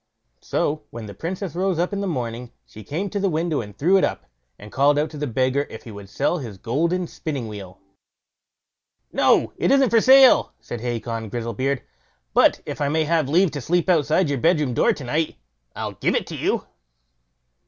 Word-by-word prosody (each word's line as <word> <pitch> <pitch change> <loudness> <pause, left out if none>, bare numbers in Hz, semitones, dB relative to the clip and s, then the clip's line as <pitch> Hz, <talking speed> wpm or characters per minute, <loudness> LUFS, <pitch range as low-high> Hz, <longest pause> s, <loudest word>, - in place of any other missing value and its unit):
So 150 +1 -1
when 115 -1 -8
the 100 - -8
Princess 180 - -5
rose 185 0 0
up 175 +4 -1
in 200 - -2
the 200 - -2
morning, 120 -6 -4
she 110 - -12
came 165 - -3
to 205 - -2
the 195 0 +1
window 160 -3 -1
and 105 -2 -11
threw 180 +7 +4
it - - 0
up, - - -1 0.3
and 105 +1 -12
called 145 +2 +3
out 150 +1 0
to 155 - -8
the 150 - -2
beggar 130 +3 0
if 110 - -10
he 115 - -10
would 100 -2 -10
sell 175 - 0
his 115 -8 -8
golden 165 - 0
spinning 145 -7 -5
wheel? 95 -4 -9 1.4
"No; - - +3
it - - +1
isn't 275 -2 +4
for 230 -1 +5
sale", 265 +1 +6
said 120 - -7
Hacon 115 -2 -4
Grizzlebeard; 120 +4 -2 0.5
"but - - +4
if - - -6
I 140 - +1
may 160 +2 +1
have 155 -3 +1
leave 175 +3 +3
to 145 - -5
sleep 175 +7 0
outside 160 +2 +2
your 140 -2 -1
bedroom 150 -4 +2
door - - +3
to 140 - -5
night, 150 +6 -1 0.4
I'll - - -4
give - - 0
it - - -2
you." - - -1
145 Hz, 195 wpm, -22 LUFS, 120-175 Hz, 1.4 s, sale